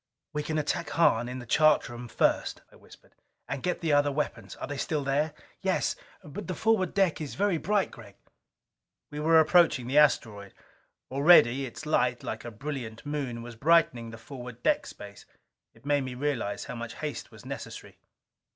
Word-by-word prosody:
"We 150 - -1
can 155 +1 -2
attack 155 +2 -1
Hahn 120 -8 +3
in 125 - -5
the 125 - -8
chart 155 +5 +4
room 120 0 -8
first," - - 0
I - - -18
whispered. - - -19 0.3
"And 140 - -4
get 180 +5 -2
the 160 -3 +1
other 145 0 +4
weapons. 130 -8 -3
Are - - -6
they 145 - -5
still 150 +1 -1
there?" 145 +3 +1 0.3
"Yes. - - 0 0.3
But 170 +5 -8
the 185 - -3
forward 220 -2 +1
deck 190 -5 +2
is 150 - -5
very 195 -4 +1
bright, 200 +4 +1
Gregg." 100 -5 -13 1.0
We 150 - -5
were 160 +2 +5
approaching 160 -5 +4
the 135 +4 +3
asteroid. 105 -9 +1 0.6
Already 140 -2 +5
its 155 +6 -9
light, 125 -5 +1
like - - -5
a 120 - -6
brilliant 120 -1 -6
moon, 135 -6 -3
was 120 -1 -9
brightening 135 -4 +3
the 115 - -9
forward 125 0 -10
deck - - +2
space. 100 0 -11 0.5
It - - -22
made 145 0 +2
me 130 -1 -5
realize 125 -7 -2
how - - -6
much 120 -1 -6
haste 150 -1 -5
was - - -15
necessary. - - -8
140 Hz, 180 wpm, -28 LUFS, 120-155 Hz, 1.0 s, were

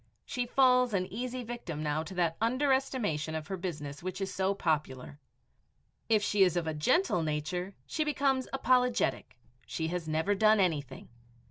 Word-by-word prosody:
She 245 -1 -3
falls 250 -3 +4
an 185 -1 +1
easy 250 +2 -4
victim 220 -10 -5
now 150 +1 0
to 170 +4 -8
that 170 -2 +1
underestimation 250 - 0
of 155 -1 -4
her 195 - -2
business 150 -6 -5
which 185 +1 -5
is 195 -1 -3
so 190 +1 0
popular. 145 -5 -2 0.9
If 215 -2 +3
she 205 -1 +1
is 180 -2 +4
of 160 -3 -2
gentle 255 - +2
nature, 160 +5 -3
she 310 - -1
becomes 275 -3 +1
apologetic, 250 - +1 0.3
she 160 -1 -3
has 175 -1 -3
"never 160 +6 +1
done 215 +1 +4
anything." 145 -8 -1
190 Hz, 155 wpm, -30 LUFS, 160-245 Hz, 0.9 s, falls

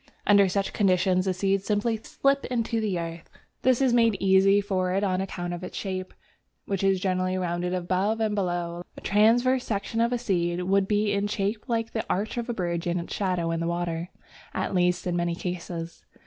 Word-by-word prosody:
Under 200 -2 +5
such 195 +1 -1
conditions 185 -2 +2
the 190 - +1
seed 195 +1 +1
simply 210 +3 0
slips 275 +5 0
into 230 -2 -1
the 205 -4 -1
earth. 165 0 -6 0.3
This 255 +1 +3
is 255 -3 +3
made 230 -4 +4
easy 195 +1 +5
for 190 -3 -1
it 195 +2 +1
on 185 -2 +1
account 175 -2 -4
of 175 +1 -6
its - - -6
shape, 185 -2 -4 0.5
which 195 -1 -2
is 195 -1 +3
generally 185 0 0
rounded 175 -1 -1
above 185 +5 0
and 220 -1 +1
below. 175 -3 -2 0.2
A - - -9
transverse 240 +5 +3
section 220 +1 -2
of 235 +1 +2
a 245 - +1
seed 180 -6 -1
would 195 +1 +2
be 210 0 +1
in 200 0 0
shape 205 +1 -2
like 230 -2 -1
the 220 - -2
arch 210 +5 -1
of 240 +1 -3
a - - 0
bridge 175 -2 -2
and 175 +1 0
its 170 - -6
shadow 180 -4 0
in 165 - -1
the 170 - -1
water, 170 0 -2 0.5
at - - -2
least 180 -1 +1
in 180 -1 -1
many 175 -1 0
cases. 170 -2 -5
190 Hz, 205 wpm, -26 LUFS, 175-210 Hz, 0.5 s, Under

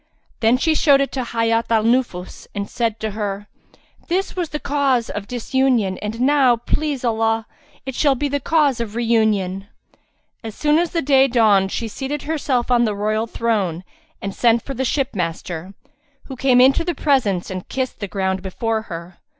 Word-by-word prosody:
Then 230 +2 +4
she 320 +5 +2
showed 285 -3 +4
it 275 - 0
to 260 - -2
Hayat 230 -1 0
al 225 -2 +3
Nufus 230 -6 -1
and 200 0 -3
said 225 -2 -2
to 220 -1 -2
her, 205 -1 -4 0.6
"This 370 +3 -1
was 350 -4 -2
the 300 - -3
cause 275 -6 0
of 205 -1 -5
disunion 245 -5 0
and 210 +2 -5
now, 265 -2 +4
please 275 +2 -2
Allah, 225 -1 +1 0.4
it 265 - -4
shall 280 +2 +2
be 290 +3 -1
the 285 0 -1
cause 290 -3 +2
of 225 -2 -4
reunion." 215 -5 +1 0.8
As 220 -2 -7
soon 300 +1 +2
as 345 0 0
day 275 -5 +3
dawned 210 -6 +3
she 230 - -3
seated 270 +6 -5
herself 275 -5 -1
on 240 -1 +4
the 215 -3 0
royal 215 +2 -1
throne 200 -8 -1 0.4
and 195 0 -3
sent 235 +1 +2
for 275 - -5
the 265 0 -2
ship 270 -1 -1
master, 175 +1 -4 0.5
who 265 - -8
came 255 -1 +3
into 265 +5 +5
the 350 -1 -2
presence 220 -12 +1
and 185 -1 -6
kissed 260 -1 -3
the 200 - -4
ground 190 -1 -2
before 220 +4 -2
her. 170 +1 -8
235 Hz, 180 wpm, -20 LUFS, 205-270 Hz, 0.8 s, into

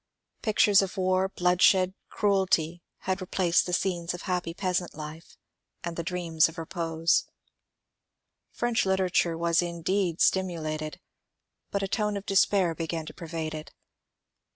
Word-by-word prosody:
Pictures 210 -3 +4
of 195 +1 -4
war, 185 0 +2
bloodshed, 185 +1 +3 0.2
cruelty 185 -5 +1 0.2
had 190 +1 -2
replaced 180 -1 +1
the - - -3
scenes 175 -2 -1
of 175 - -9
happy 180 -3 -2
peasant 180 0 -2
life 155 +1 -9 0.5
and 170 -1 -4
the 170 - -2
dreams 170 -2 +1
of 165 - -13
repose. 165 0 0 1.2
French 240 -1 0
literature 185 -3 +1
was 170 0 +2
indeed 175 +1 -1
stimu 185 -2 +2
lated, 155 -1 -4 0.7
but 200 0 -2
a - - 0
tone 210 0 -1
of 200 - -7
despair 195 -3 +3
began 165 0 -4
to - - -9
pervade 160 -2 -5
it. 155 0 -8
175 Hz, 135 wpm, -27 LUFS, 165-190 Hz, 1.2 s, Pictures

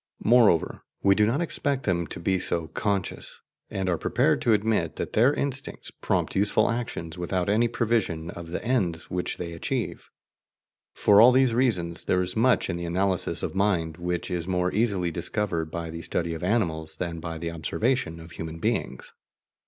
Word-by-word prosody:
Moreover, 110 -8 +4 0.2
we 100 - +6
do 105 +1 +3
not 135 +8 +1
expect 140 -5 -1
them 85 -4 0
to - - -7
be 95 +2 +1
so 85 -2 -2
"conscious," 100 +2 -3 0.3
and 95 -1 -3
are 85 -3 0
prepared - - +2
to 115 - +2
admit 105 -6 +1
that - - -5
their 120 +6 +5
instincts 140 -2 -4
prompt - - -1
useful 105 +3 +3
actions 90 -8 -4
without 90 +1 -1
any 110 +3 +3
prevision 110 -9 -1
of 85 -1 -9
the 90 - -5
ends 95 -10 -1
which 90 0 -2
they 85 -1 -5
achieve. 85 - -3 0.9
For 105 0 +6
all 120 +2 +9
these 130 -2 +4
reasons, 90 -9 +1
there 90 0 +2
is 90 - -4
much 125 +3 +3
in 85 - -2
the 85 - -4
analysis 95 +2 -1
of - - -2
mind 90 -5 0
which 90 +1 -3
is 90 -1 -2
more 90 -1 0
easily 100 -6 +1
discovered 85 -1 -2
by 85 0 -5
the 85 0 -6
study 85 +1 -2
of 80 - -6
animals 80 -7 -1
than 85 -2 -3
by 80 0 -5
the 85 +1 -4
observation 85 +2 -1
of 80 0 -12
human 80 -1 -6
beings. 65 -5 -2
90 Hz, 180 wpm, -26 LUFS, 85-110 Hz, 0.9 s, all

